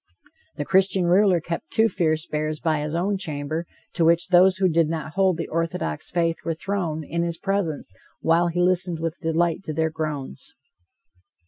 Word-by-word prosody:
The 145 - -2
Christian 190 0 +3
ruler 185 0 +4
kept 170 +1 -5
two 220 +1 +3
fierce 160 -6 0
bears 155 -1 -3
by 155 -2 0
his 150 +2 -3
own 190 +3 0
chamber, 155 -1 -3 0.3
to 170 - +1
which 170 +2 +3
those 185 +1 +5
who 190 -1 +3
did 165 -2 +2
not 155 -1 -4
hold 190 -2 +2
the 165 - -3
orthodox 160 - -2
faith 165 -1 0
were 165 - -2
thrown 165 -4 -3
in 170 +3 -2
his 170 -1 -2
presence 185 - -2 0.3
while 165 +2 +3
he 175 +1 -1
listened 180 -2 +2
with 165 0 -3
delight 165 0 0
to 155 - -3
their 160 0 0
groans. 150 - -5
165 Hz, 180 wpm, -24 LUFS, 155-180 Hz, 0.3 s, those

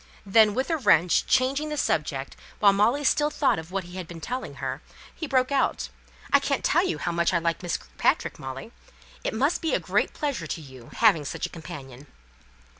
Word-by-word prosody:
Then, 210 +1 +5
with 260 +6 -1
a 325 - +2
wrench, 175 - +3
changing 275 +4 +2
the 300 - -3
subject, 150 - -1 0.2
while 200 -2 +5
Molly 230 +8 +2
still 295 +1 +3
thought 275 - +1
of 160 +1 -9
what 195 0 -2
he 175 +2 -10
had 180 -3 -6
been 170 0 -9
telling 250 +9 -5
her, - - -4 0.3
he 315 - -5
broke 260 -1 +1
out, 275 - 0 0.4
"I - - +8
can't - - -1
tell 345 - +3
you 370 - -1
how 175 - -2
much 170 +1 +1
I - - +5
like 170 0 -1
Miss 175 -2 -1
Kirkpatrick, - - -1
Molly. 135 - -7 0.5
It - - -2
must 280 +8 +1
be 325 - +1
a - - +1
great - - 0
pleasure 275 - -2
to 165 - -4
you 130 -5 -13
having 205 -10 +4
such 140 - -4
a - - -5
companion!" 145 -5 -10
195 Hz, 205 wpm, -26 LUFS, 160-265 Hz, 0.5 s, I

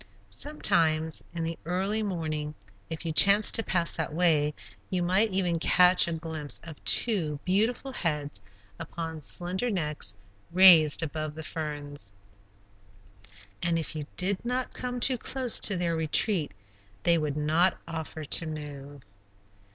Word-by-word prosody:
Sometimes, 160 - +1
in 170 -1 -5
the 165 0 -5
early 190 +6 -2
morning, 155 -6 -4 0.3
if 160 +1 -6
you 165 - -2
chanced 200 +5 +5
to - - +6
pass 175 -6 -1
that 160 -2 -3
way, 155 -3 +2 0.4
you 180 -2 -1
might 190 +5 +2
even 180 -3 0
catch 180 +1 +5
a 170 - -3
glimpse 160 -3 -1
of 160 -3 -12
two 165 -11 +2
beautiful 225 +8 0
heads 150 - -3 0.4
upon 165 -1 -7
slender 185 - -2
necks 150 - 0 0.4
raised 170 -4 +6
above 155 -1 -5
the 160 - -8
ferns, 145 -8 -5 1.5
and 170 -1 +1
if 160 -1 -4
you 150 -2 -6
did 185 +1 +1
not 250 +1 -3
come 250 0 -5
too 255 0 +2
close 255 -1 0
to 200 - +1
their 170 -1 -1
retreat, 160 +1 +1 0.5
they 170 -1 +3
would 150 -1 -3
not 160 +5 +1
offer 160 -1 -6
to 165 +3 +4
move. 145 -2 -8
165 Hz, 140 wpm, -27 LUFS, 155-185 Hz, 1.5 s, to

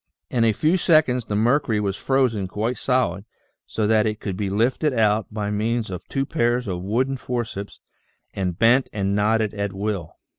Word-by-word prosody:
In 120 -2 +2
a 115 - +4
few 155 - +2
seconds 155 -9 +3
the 105 - -3
mercury 115 0 +2
was 100 -2 -1
frozen 125 -8 +1
quite 110 +6 -2
solid 125 -8 0 0.4
so 110 - -1
that 110 0 +3
it 105 0 -3
could 95 -3 -4
be 100 0 -2
lifted 125 +8 +1
out 110 -2 +1
by 105 -1 -3
means 110 +1 -1
of 90 - -7
two 135 0 -1
pairs 120 -5 0
of 90 -2 -3
wooden 125 +8 0
forceps 120 -6 -5 0.5
and 90 -3 -2
bent 125 +4 +4
and 100 -2 -1
knotted 110 +1 +1
at 100 -1 -3
will. 100 -4 -4
110 Hz, 180 wpm, -23 LUFS, 100-125 Hz, 0.5 s, a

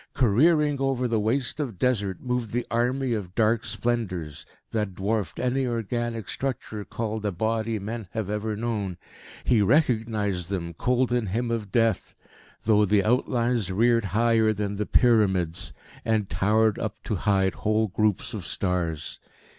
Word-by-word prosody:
Careering 145 +4 +3
over 135 -2 +1
the 115 -2 +1
waste 115 +6 0
of 125 -10 -3
Desert 100 -5 0
moved 125 -3 -2
the 120 0 -1
army 125 +2 +1
of 95 -5 -4
dark 115 0 +2
Splendours, 105 -10 -2 0.2
that 105 -4 -2
dwarfed 100 -2 -2
any 125 +1 0
organic 115 -1 -2
structure 120 -5 -4
called 110 0 -4
a 105 - 0
body 110 +4 -1
men 110 +1 -5
have 110 -4 -2
ever 105 +1 -2
known. 105 -5 -3 0.5
He 120 -4 +3
recognised 110 - +1
them, 85 -4 -3
cold 125 +7 +1
in 120 -3 +1
him 115 +5 -1
of 110 -4 -3
death, 115 -4 +1 0.5
though 105 -1 +4
the 100 0 +3
outlines 120 -3 +1
reared 115 +3 +3
higher 110 +2 +3
than 100 -1 -3
the 105 - -2
pyramids, 95 -9 +2 0.3
and 110 -3 +1
towered 110 +1 +2
up 110 -1 -3
to 105 - -2
hide 95 -1 +2
whole 110 +1 +2
groups 105 0 0
of - - -4
stars. 85 -5 -2
110 Hz, 150 wpm, -26 LUFS, 100-120 Hz, 0.5 s, though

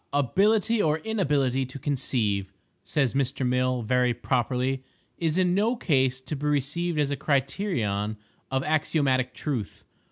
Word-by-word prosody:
—"Ability 200 - +2
or 155 -3 +2
inability 145 - 0
to 135 - -8
conceive," 115 -8 -1 0.3
says 135 -5 0
Mr. 135 -1 0
Mill, 125 -1 +1
very 125 +1 +2
properly, 130 +2 -1 0.4
"is 165 0 0
in 180 -1 +3
no 215 +6 +2
case 130 - +1
to 130 +4 -5
be 145 +1 -3
received 150 +4 0
as 145 -1 +1
a - - +1
criterion 130 - -1 0.3
of 135 0 0
axiomatic 140 -4 +1
truth." 125 -10 -4
135 Hz, 135 wpm, -26 LUFS, 125-155 Hz, 0.4 s, in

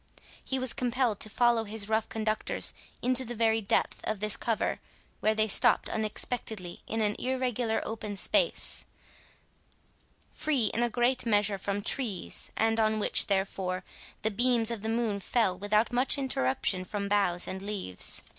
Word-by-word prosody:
He 265 - -3
was 255 -2 +1
compelled 245 -3 -1
to 215 - 0
follow 235 0 +2
his 210 -1 -3
rough 220 0 -1
conductors 215 -1 -1 0.3
into 255 +1 +6
the 240 -1 -7
very 225 0 +1
depth 200 - -1
of 215 -2 -2
this 210 0 +5
cover, 225 -3 -2 0.4
where 215 0 +1
they 215 0 +1
stopt 200 - +4
unexpectedly 215 -3 -3
in 225 - -2
an 210 -1 +1
irregular 250 -3 -1
open 215 -2 -5
space, - - +2 1.5
free 270 -8 0
in 235 - -1
a 240 - +1
great 245 +2 0
measure 205 -2 +1
from 200 +1 -3
trees, 210 -10 +1
and 225 0 +1
on 220 0 +1
which, 210 - +4
therefore, 190 -2 -2 0.4
the 220 - +1
beams 235 +1 +2
of 230 -3 -4
the 220 - -4
moon 225 -3 -1
fell 195 -1 0
without 210 +5 0
much 255 +4 +2
interruption 185 - 0
from 200 +2 -4
boughs 195 -4 +1
and 190 0 -5
leaves. 195 - +1
220 Hz, 155 wpm, -28 LUFS, 205-240 Hz, 1.5 s, into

